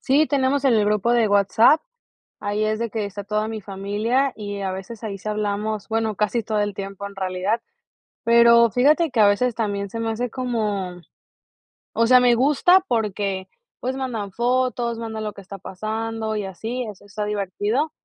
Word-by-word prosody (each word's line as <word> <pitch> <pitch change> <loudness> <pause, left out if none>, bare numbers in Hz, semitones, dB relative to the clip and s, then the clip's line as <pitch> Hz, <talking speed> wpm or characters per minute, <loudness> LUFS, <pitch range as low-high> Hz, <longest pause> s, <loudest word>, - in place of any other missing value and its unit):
Sí, 290 +4 +3
tenemos 275 0 +1
en 255 -4 +4
el 210 -1 +3
grupo 210 +3 +1
de 230 -3 +3
WhatsApp, 205 +9 +4 0.6
ahí 205 +1 -1
es 215 +1 -1
de 235 -1 -2
que 215 -1 -2
está 200 0 -6
toda 215 +2 -1
mi 220 -1 -5
familia 210 +8 -1
y 205 -2 -5
a 190 -1 -2
veces 195 +4 -8
ahí 200 -2 -4
sí 205 - -9
hablamos, 210 0 -2
bueno, 220 -1 0
casi 215 +2 0
todo 215 -1 -1
el 205 -1 -1
tiempo 195 0 -6
en 200 - -13
realidad. 190 +4 -1 0.6
Pero 235 0 +6
fíjate 295 - +3
que 235 -3 +1
a 205 - +7
veces 235 +4 +1
también 200 -3 -2
se 230 - -5
me 225 0 -1
hace 240 +1 -2
como 210 -8 -2 0.9
o 230 - +2
sea, 250 +1 +7
me 245 -1 +4
gusta 300 +8 +4
porque, 200 -4 -1 0.3
pues, 255 +1 -3
mandan 225 -7 -4
fotos, 240 0 0
mandan 220 -1 -5
lo 210 - -4
que - - -11
está 195 +1 -9
pasando 220 +3 -4
y 205 -2 -2
así. 225 +6 -4
Eso 205 -1 -12
está 205 +1 -4
divertido 210 - -1
215 Hz, 185 wpm, -22 LUFS, 205-235 Hz, 0.9 s, a